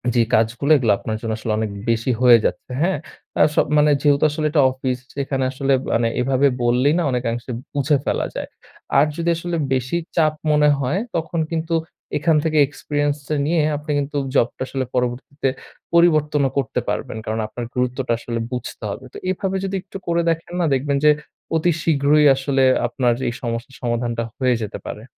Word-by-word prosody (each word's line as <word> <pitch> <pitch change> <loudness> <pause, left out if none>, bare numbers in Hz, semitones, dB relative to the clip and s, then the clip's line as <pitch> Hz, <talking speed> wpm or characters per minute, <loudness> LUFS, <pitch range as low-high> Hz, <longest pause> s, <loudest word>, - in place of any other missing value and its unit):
যে 120 - +5
কাজগুলো 115 +7 +1
এগুলো 120 -6 +2
আপনার 110 -1 -3
জন্য 115 - -3
আসলে 110 - -3
অনেক 110 -1 -1 0.2
বেশি 115 +2 +1
হয়ে 120 -2 +8
যাচ্ছে। - - -2
হ্যাঁ? 180 0 +2 0.4
আস 150 - +4 0.2
মানে 150 0 +5
যেহেতু 145 0 +3
আসলে 155 +1 -2
এটা 150 -2 +4
অফিস 130 -1 -3 0.2
এখানে 135 -1 -1
আসলে 135 +1 0 0.2
মানে 115 0 +2
এভাবে 135 +2 +3 0.2
বললেই 125 +5 +3
না - - +1
অনেকাংশে 120 0 -2 0.2
বুঝে 145 +1 +2
ফেলা - - 0
যায়। - - -4 0.5
আর 145 - +5
যদি 170 +1 -1
আসলে 175 +1 -3 0.2
বেশি 130 +6 0 0.2
চাপ 155 -2 +3 0.2
মনে 150 0 +4
হয়, 140 +8 0 0.2
তখন 165 0 -2
কিন্তু 165 0 -2 0.4
এখান 160 +2 +2
থেকে 155 -1 0
experience 145 0 -2
টা 155 - 0
নিয়ে 160 +1 +2 0.2
আপনি 150 +1 -5
কিন্তু 145 +1 -3 0.2
জব 120 - +4
টা - - -2
আসলে 135 -1 -2
পরবর্তীতে 125 +3 -1 0.4
পরিবর্তন 155 -3 +4
ও - - -2
করতে 135 - 0
পারবেন। - - -3
কারণ 110 0 -2
আপনার 120 +2 -6
গুরুত্বটা 125 0 0
আসলে 115 0 -4
বুঝতে 125 -2 -6
হবে। 125 +6 -6
তো - - -8
এভাবে 190 +1 -1
যদি 195 0 -3
একটু 195 +1 -9
করে 170 0 +2
দেখেন 165 +1 -2
না, 175 - +2
দেখবেন 140 +1 0
যে 150 - +8 0.4
অতি 165 +2 +2
শীঘ্রই 150 -1 +3
আসলে 135 0 +1 0.2
আপনার 120 0 +1
এই 120 - -1
সমস্যার 115 +1 -4
সমাধানটা 120 -1 -1
হয়ে 130 -2 +2
যেতে 105 - -6
পারে। 105 - -6
140 Hz, 180 wpm, -21 LUFS, 120-155 Hz, 0.5 s, হয়ে